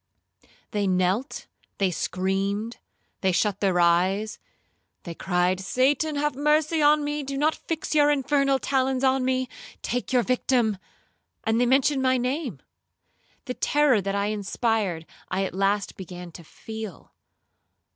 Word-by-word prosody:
They 205 -2 0
knelt,—they 185 +1 -1
screamed,—they 195 +2 -3
shut 200 +2 +1
their 190 -3 +1
eyes,—they 180 0 -1
cried, 180 +1 0
'Satan 275 - +1
have 295 +1 0
mercy 300 +3 +2
on 295 0 +5
me,—do 290 -2 -3
not 305 +3 +2
fix 320 -1 -4
your 295 -1 +5
infernal 275 -1 +2
talons 265 -1 0
on 265 0 +3
me,—take 255 -1 -3
your 250 -2 +3
victim,' 240 -4 +1 0.6
and 225 +2 +1
they 245 - +3
mentioned 270 +2 +3
my 260 0 +3
name. 250 - -3 0.8
The 250 - -3
terror 285 -5 +2
that 195 +1 -2
I 200 +1 0
inspired 205 -4 -1 0.2
I 190 +1 0
at - - -5
last 195 +1 0
began 180 -1 -8
to 170 - -11
feel. 220 +2 -9
230 Hz, 125 wpm, -25 LUFS, 195-275 Hz, 0.8 s, on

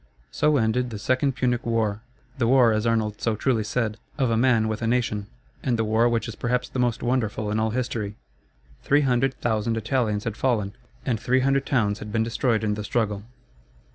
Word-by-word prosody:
So 150 -1 +2
ended 125 +1 +1
the 110 - -6
Second 130 +6 +1
Punic 125 -2 0
War 110 -3 0 0.4
the 115 - +2
war, 125 -3 +5
as 110 +2 0
Arnold 110 -2 0
so 115 -2 +1
truly 115 0 +1
said, 110 0 -1 0.2
of 130 -5 +1
a - - +2
man 115 -2 +3
with 110 0 -3
a 115 - 0
nation, 115 -4 0 0.3
and 125 -3 0
the 115 - +1
war 110 +2 +3
which 115 -2 0
is 115 - -5
perhaps 125 +2 -1
the 130 - -5
most 120 -2 0
wonderful 110 -4 -1
in 105 - 0
all 110 0 +1
history. 110 -3 -3 0.7
Three 145 +1 +3
hundred 135 0 +1
thousand 115 0 0
Italians 110 -2 0
had 110 - -3
fallen, 110 -7 0 0.3
and 120 -5 0
three 130 +4 +2
hundred 135 +1 +1
towns 110 -6 +1
had 105 - -7
been 110 0 +1
destroyed 115 0 0
in 105 -1 +1
the 105 0 -4
struggle. 105 -2 -1
115 Hz, 200 wpm, -25 LUFS, 110-125 Hz, 0.7 s, war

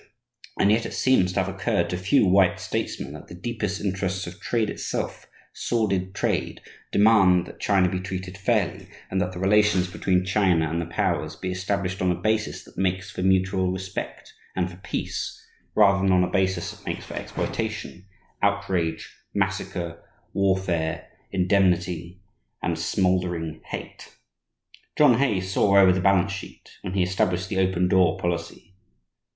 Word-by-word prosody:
And 100 - +4
yet 115 +2 +2
it - - -8
seems 95 -9 +3
to 95 - +2
have 95 0 -5
occurred 100 - 0
to - - -1
few 95 +8 +3
white 95 -1 +4
statesmen - - -3
that - - -10
the - - -10
deepest 105 +1 -3
interests 95 -1 -2
of 90 +3 -10
trade 115 -3 0
itself, - - -4 0.3
sordid 100 -5 -1
trade, - - -1 0.3
demand 100 -4 +5
that - - -12
China 95 -2 +3
be 90 +1 -2
treated 95 0 -5
fairly 100 -3 0 0.2
and 95 - +1
that 90 - -1
the 90 - -8
relations 95 -1 +3
between 90 0 0
China 90 -4 +2
and 85 +2 -1
the 85 - -5
powers 85 - -1
be 95 - -4
established 95 0 -2
on 90 - +2
a - - 0
basis 110 +5 -1
that - - -12
makes 95 +1 -1
for 105 - -5
mutual 95 0 +2
respect 95 0 -6 0.2
and 90 -1 -1
for 85 - -12
peace, 95 - -4 0.4
rather 100 -2 +5
than 95 0 +3
on 90 -1 +4
a - - -2
basis 95 -3 0
that - - -15
makes - - -4
for - - -9
exploitation, 95 +2 -4 0.3
outrage, 100 -5 -1 0.2
massacre, 95 -3 -2 0.3
warfare, 95 -4 0 0.2
"indemnity," 90 -2 +1 0.4
and 85 -2 -1
smouldering 90 -2 0
hate. - - -8 0.8
John 130 -6 +6
Hay 110 -9 +2
saw 95 +1 +2
over 95 -1 +7
the 95 0 0
balance 95 0 +3
sheet, 100 - -9
when 90 - -5
he 95 -2 +2
established 90 0 0
the 95 - -1
"open 95 -1 +2
door" 90 -2 +3
policy. 85 +2 -4
95 Hz, 160 wpm, -25 LUFS, 90-100 Hz, 0.8 s, over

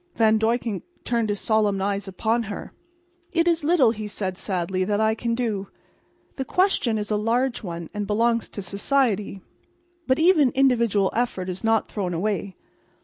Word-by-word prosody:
Van 220 -1 +4
Duyckink 225 -2 0 0.2
turned 230 -2 0
his 205 -1 -1
solemn 210 -3 +1
eyes 200 0 -1
upon 220 +5 0
her. 205 - -7 0.6
"It 335 0 +2
is 335 -2 +2
little," 290 -7 +4
he 215 -2 -5
said, 190 -2 -3
sadly, 185 -1 -2
"that 205 +2 0
I 220 0 +3
can 230 +1 -2
do. 215 -5 -2 0.7
The 265 - -1
question 270 - +1
is 210 0 -4
a 210 - +2
large 235 +4 0
one, 170 -5 -6
and 205 -1 -3
belongs 230 +2 +1
to 200 - -6
society. 205 -2 0 0.7
But 260 0 +3
even 320 -5 +5
individual 235 -7 +3
effort 220 -6 -1
is 185 +3 -5
not 225 -1 +2
thrown 185 -5 -3
away. 200 +1 -2
220 Hz, 165 wpm, -24 LUFS, 200-240 Hz, 0.7 s, even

